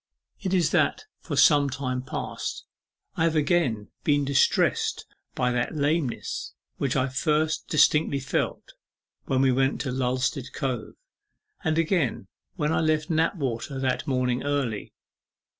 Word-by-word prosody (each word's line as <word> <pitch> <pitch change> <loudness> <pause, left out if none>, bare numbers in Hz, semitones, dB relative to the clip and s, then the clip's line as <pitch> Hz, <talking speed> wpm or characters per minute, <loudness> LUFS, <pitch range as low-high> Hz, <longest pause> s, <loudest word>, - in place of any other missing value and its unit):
It 190 -3 -3
is 175 -5 +2
that - - +1
for - - -5
some 145 -2 +5
time 130 -1 -3
past 130 - -5 0.5
I 165 - +2
have 165 -1 +1
again 145 -9 +1
been 145 -1 +2
distressed 135 0 +2 0.3
by 125 0 +1
that 120 +4 -1
lameness 150 -2 -1 0.2
which 135 -3 -1
I 130 0 +2
first 150 +3 0
distinctly 150 -2 +3
felt 130 0 -3 0.5
when 130 0 +1
we 130 - +4
went 135 +1 +1
to 135 - -2
Lulstead 130 +1 -1
Cove, 130 -6 -3 0.7
and 160 0 +1
again 165 - +1 0.3
when 155 -3 0
I - - +2
left 155 0 +1
Knapwater 140 - -1
that 130 -1 -1
morning 125 -2 0
early. 140 -7 -2
140 Hz, 135 wpm, -26 LUFS, 130-155 Hz, 0.7 s, some